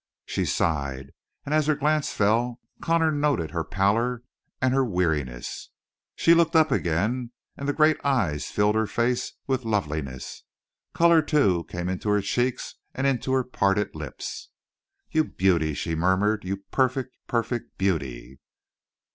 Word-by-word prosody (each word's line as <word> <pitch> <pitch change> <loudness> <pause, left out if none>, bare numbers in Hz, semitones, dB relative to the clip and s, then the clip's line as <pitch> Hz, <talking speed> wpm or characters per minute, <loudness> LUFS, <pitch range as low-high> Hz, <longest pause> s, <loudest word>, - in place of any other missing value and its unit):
She - - -1
sighed, 70 -4 -1 0.3
and 145 - -2
as 155 -1 +2
her 155 - +3
glance 150 +1 +1
fell 115 +4 +1 0.2
Connor 165 -1 +2
noted 145 - 0
her 80 -1 -2
pallor 115 +7 0 0.4
and 130 0 +2
her 135 0 +3
weariness. 80 - -2 0.5
She 165 - +5
looked 170 0 +3
up 155 -2 +5
again, 115 +6 0 0.2
and 140 +1 -4
the - - +1
great 155 0 +3
eyes 105 - 0
filled 105 +1 +2
her 110 0 +1
face 120 +3 -1
with 130 -2 -1
loveliness. 75 - -3 0.5
Color, 170 -1 +5
too, 100 - +2
came 90 0 -5
into 95 +3 -2
her 105 0 +3
cheeks 120 +5 -1 0.2
and 130 - -1
into 130 -1 0
her 130 -1 +3
parted 100 -4 0
lips. 75 -3 -7 0.6
"You 155 - +3
beauty!" 85 - +1
she 80 - -3
murmured. 95 +5 +1
"You 95 +2 -2
perfect, 130 -1 0
perfect 120 0 -2
beauty!" 70 -9 -2
110 Hz, 145 wpm, -25 LUFS, 85-135 Hz, 0.6 s, She